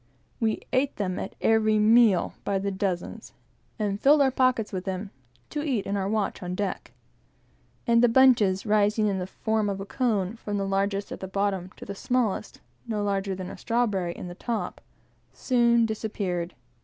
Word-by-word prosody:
We 220 -2 0
ate 265 +2 +1
them 185 -3 -2
at - - -6
every 220 -1 +3
meal, 215 -3 +4
by 200 - 0
the 200 +1 -2
dozen; 190 +2 -3 0.6
and 205 -2 -2
filled 285 +1 +6
our 265 - +3
pockets 255 -5 +1
with 185 -1 -3
them, 190 +1 -4 0.4
to 295 - -2
eat 265 -9 -1
in 200 - -2
our 195 -1 -1
watch 215 -2 -1
on 180 0 -4
deck; 200 0 -3 0.9
and 235 -1 +4
the 245 - +5
bunches, 230 -7 +4
rising 210 0 +2
in 195 -2 0
the 180 - -4
form 220 +2 -1
of 195 -1 -3
a 195 - -5
cone, 215 -3 -1
from 205 -2 -4
the 195 - -1
largest 195 +1 -1
at - - -6
the 190 - -5
bottom, 195 -1 -1
to - - -9
the 200 - -5
smallest, 220 0 -1 0.3
no 215 -2 -1
larger 195 -1 -1
than 185 0 -6
a - - -9
strawberry, 205 -7 0
at - - -6
the 175 - -7
top, 230 +5 -4 0.5
soon 235 -2 +3
disappeared. 200 -6 -3
205 Hz, 180 wpm, -26 LUFS, 195-230 Hz, 0.9 s, filled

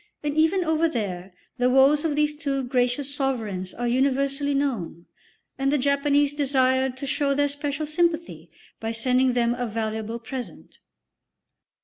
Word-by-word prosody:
And 295 0 -2
even 325 +4 +3
over 320 0 +1
there 195 - -4 0.3
the 250 0 +3
woes 270 +3 +5
of 315 -3 0
these 300 0 +1
two 280 -3 -2
gracious 250 +2 0
sovereigns 220 -10 -2
are 240 - -3
universally 275 +3 +1
known, 225 - -2 0.5
and 270 0 +1
the 295 - +3
Japanese 280 +1 +2
desired 260 -2 +1
to 275 - -5
show 280 0 0
their 285 0 +2
special 285 +1 -2
sympathy 315 - -1 0.3
by 225 0 -3
sending 255 +2 +2
them 240 -1 +2
a 245 0 -3
valuable 220 0 -3
present. 245 +1 -8
270 Hz, 145 wpm, -24 LUFS, 240-290 Hz, 0.5 s, woes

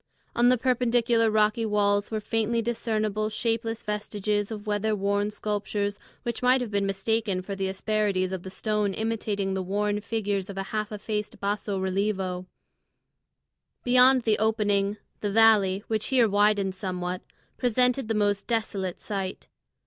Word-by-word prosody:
On 240 +1 +5
the 255 - +4
perpendicular 235 -2 +2
rocky 215 +1 +2
walls 205 -1 +1
were 220 - -2
faintly 225 +2 0
discernible 215 -2 -1
shapeless 225 +1 -2
vestiges 210 -1 -2
of 215 -2 -6
weather 210 +1 0
worn 200 +1 0
sculptures 205 -1 -2 0.2
which 235 -2 -3
might 250 +1 +4
have 245 -4 -4
been 200 -1 +1
mistaken 195 -1 -1
for 200 +1 -5
the 195 0 -1
asperities 195 -1 0
of 190 -2 -3
the 190 - -8
stone 210 0 -1
imitating 215 -3 -1
the 190 - -1
worn 205 +2 -1
figures 205 -3 -2
of 195 - -7
a 195 - -1
half 215 0 -1
effaced 210 0 -4
basso 200 0 -2
relievo. 190 -1 -1 1.4
Beyond 255 +1 +5
the 220 -2 +2
opening, 205 -2 +1 0.2
the 205 - -2
valley, 205 -3 +4
which 220 -1 -1
here 250 -4 +4
widened 205 -1 +2
somewhat, 180 -1 -4 0.4
presented 250 0 +2
the 225 - 0
most 205 -1 +1
desolate 200 -6 -2
sight. 195 -3 -5
210 Hz, 150 wpm, -27 LUFS, 200-225 Hz, 1.4 s, On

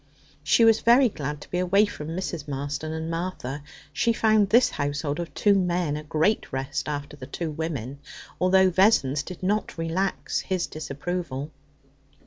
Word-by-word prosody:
She 230 +9 +4
was 225 -1 +5
very 240 +2 +5
glad 150 -5 -5
to - - -13
be 180 - 0
away 195 +3 +4
from 155 -7 -7
Mrs. 165 -2 -4
Marston 145 +2 -4
and 160 0 -4
Martha. 165 -5 -4 0.3
She 230 +9 +2
found 215 -3 +3
this 240 +4 +5
household 145 +1 -2
of 170 -1 -4
two 205 - +4
men 175 -5 +1
a 150 - -4
great 155 +8 0
rest 135 +3 -3
after 145 0 -5
the 130 -3 -10
two 160 +2 -4
women, 140 -4 -4 0.4
although 185 0 +4
Vessons 170 -8 +3
did 180 +4 -9
not 205 +1 -1
relax 165 +4 -1
his 185 -3 -1
disapproval. 155 -1 -5
165 Hz, 160 wpm, -25 LUFS, 145-190 Hz, 0.4 s, was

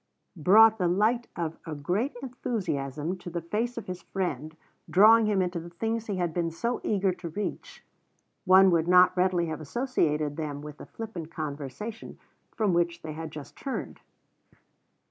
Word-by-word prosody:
brought 215 +7 +6
the 180 - +2
light 215 +7 +2
of 165 -2 -4
a 160 -2 -6
great 195 - -1
enthusiasm 170 - -3
to 180 - -9
the 170 0 -3
face 225 +8 -2
of 230 - -5
his 180 -1 -6
friend, 160 -5 -4 0.3
drawing 220 +3 +6
him 200 -3 +2
into 180 -1 -2
the 170 +1 -9
things 225 +6 -3
he 205 - -2
had 175 -3 -1
been 170 -1 0
so 235 +9 -2
eager 195 -3 +1
to 175 -1 -7
reach, 205 +6 -6 0.6
one 190 0 +7
would 165 -1 +2
not 180 0 +6
readily 180 -1 +2
have 160 -1 -5
associated 155 - -1
them 150 -3 -4
with 150 -1 -9
the - - -10
flippant 200 -8 -7
conversation 155 - -6 0.3
from 210 -5 0
which 170 0 0
they 155 -1 -5
had 160 +1 -6
just 150 -2 -10
turned. 270 - -5
180 Hz, 165 wpm, -28 LUFS, 160-215 Hz, 0.6 s, one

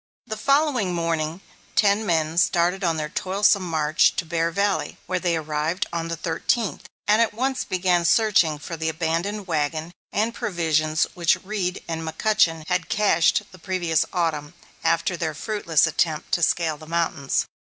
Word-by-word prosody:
The 220 -3 -4
following 265 - +1
morning 165 0 -2 0.3
ten 205 +1 +3
men 160 -1 +1
started 180 +2 +2
on 165 -2 +1
their 155 -1 -2
toilsome 195 +4 +2
march 155 -3 +2
to 175 - -2
Bear 165 0 0
Valley, 200 +4 -1
where 185 +1 -1
they 175 -2 0
arrived 155 +3 -2
on 165 -1 -2
the 165 - -3
thirteenth, 175 +7 -2 0.2
and 210 +2 +4
at 225 -2 +1
once 260 +3 -1
began 180 -1 +1
searching 175 -4 +3
for 160 +3 -7
the 160 0 -2
abandoned 170 +6 -2
wagon 155 0 -2 0.2
and 220 +3 0
provisions 155 -6 0
which 170 -2 +2
Reed 190 -2 -3
and 165 -1 -3
McCutchen 165 -1 +1
had 180 -2 -1
cached 200 -7 +3
the 185 - -14
previous 175 -3 0
Autumn, 160 -3 -2 0.3
after 165 +2 +1
their 160 -2 -3
fruitless 170 -4 +1
attempt 160 -1 -1
to 175 - +1
scale 160 -2 +1
the 155 +1 -13
mountains. 165 -4 0
170 Hz, 160 wpm, -23 LUFS, 160-195 Hz, 0.3 s, and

